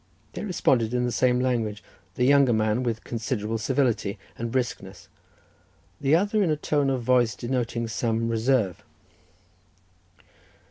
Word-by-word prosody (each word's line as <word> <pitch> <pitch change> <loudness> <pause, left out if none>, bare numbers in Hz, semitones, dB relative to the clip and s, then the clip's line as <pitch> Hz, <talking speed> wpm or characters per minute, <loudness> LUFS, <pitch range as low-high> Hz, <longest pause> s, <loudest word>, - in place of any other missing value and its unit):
They - - -5
responded 125 - +1
in 125 0 +1
the 120 - -1
same 125 0 +2
language, 115 -5 -1 0.3
the 125 - +1
younger 140 -2 +5
man 110 +2 +1
with 115 -3 -2
considerable 115 -1 -3
civility 115 -5 0 0.2
and 115 0 -4
briskness, 125 -2 -4 0.9
the 140 +2 +3
other 205 +4 +2
in 185 - +2
a 155 - +2
tone 145 -2 0
of 130 -3 -1
voice 120 -1 +2
denoting 120 -1 -2
some 115 0 -1
reserve. 115 -4 0
120 Hz, 135 wpm, -25 LUFS, 115-130 Hz, 0.9 s, younger